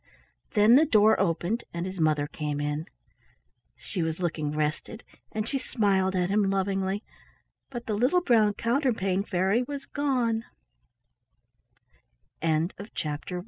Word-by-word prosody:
Then 215 +4 +7
the 310 - +5
door 220 -4 +5
opened 175 +7 0
and 170 +1 -2
his 190 -1 -6
mother 155 -2 +2
came 150 -1 -4
in. 150 +3 -2 0.9
She 185 - -5
was 160 0 -2
looking 155 -4 -1
rested, 150 +8 -3 0.3
and 215 0 -3
she 275 +2 -1
smiled 195 -6 +1
at 180 0 0
him 205 -1 +2
lovingly, 195 +1 -1 0.7
but 240 -3 -6
the 215 - -2
little 255 - +3
brown 220 - +3
Counterpane 230 -7 0
Fair 190 -1 0
195 Hz, 110 wpm, -27 LUFS, 170-220 Hz, 0.9 s, Then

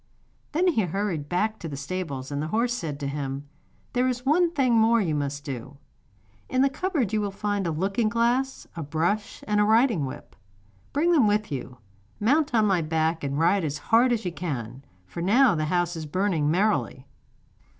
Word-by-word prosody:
Then 335 +5 +2
he 275 -11 +2
hurried 180 -5 -2
back 215 +5 0
to 165 - -6
the 140 - -6
stables, 140 -3 -5
and 145 0 -2
the 155 - -2
horse 235 +7 0
said 155 -11 -4
to 140 - -2
him: 140 0 -4 0.5
'There 250 +1 +2
is 250 0 -2
one 335 +5 +4
thing 270 -7 +1
more 230 +1 +4
you 175 -7 0
must 145 -1 -2
do. 135 0 -7 0.7
In 260 0 +2
the 275 - +2
cupboard 295 - -1
you 215 - +2
will 205 - -1
find 200 -1 -2
a - - 0
looking 195 +7 0
glass, 240 +4 0
a 165 - -4
brush 165 +8 -2
and 210 -1 +2
a - - +5
riding 220 - +3
whip. 140 +3 -10 0.6
Bring 325 +5 +2
them 285 -10 +5
with 210 -2 0
you, 130 -2 -5 0.4
mount 280 +5 +2
on 220 -2 +4
my 190 -4 +2
back, 160 +1 0
and 140 0 -2
ride 175 +4 +3
as 145 -2 -2
hard 235 - +3
as 230 -4 -1
you 180 - -1
can, 135 -7 -5 0.2
for 170 - -7
now 230 +6 +5
the 155 -2 -1
house 175 +1 0
is 160 -2 -6
burning 170 -3 0
merrily. 180 -7 0
190 Hz, 195 wpm, -26 LUFS, 150-230 Hz, 0.7 s, a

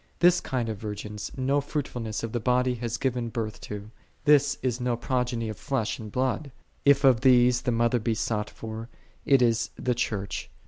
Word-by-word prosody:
This 175 +1 +5
kind 125 -3 -2
of 110 -2 -3
virgins 105 -1 -5
no 135 +2 +2
fruitfulness 125 -7 -4
of 115 - -3
the 120 - -1
body 125 +2 +2
hath 120 0 -3
given 125 -3 -1
birth 110 -3 -4
to: 105 +1 -7 0.3
this 145 -1 +5
is 125 -1 -1
no 125 -1 0
progeny 125 -1 -1
of 110 - -5
flesh 130 -6 -1
and 110 -2 -8
blood. 130 +3 -1 0.3
If 140 0 +5
of 130 -4 +5
these 125 -1 +5
the 125 -2 0
mother 120 +1 +2
be 110 +1 0
sought 105 -1 -1
for, 110 +1 -7 0.4
it 135 -3 +5
is 115 -1 +2
the 125 - 0
Church. 105 -5 -3
120 Hz, 185 wpm, -27 LUFS, 110-130 Hz, 0.4 s, This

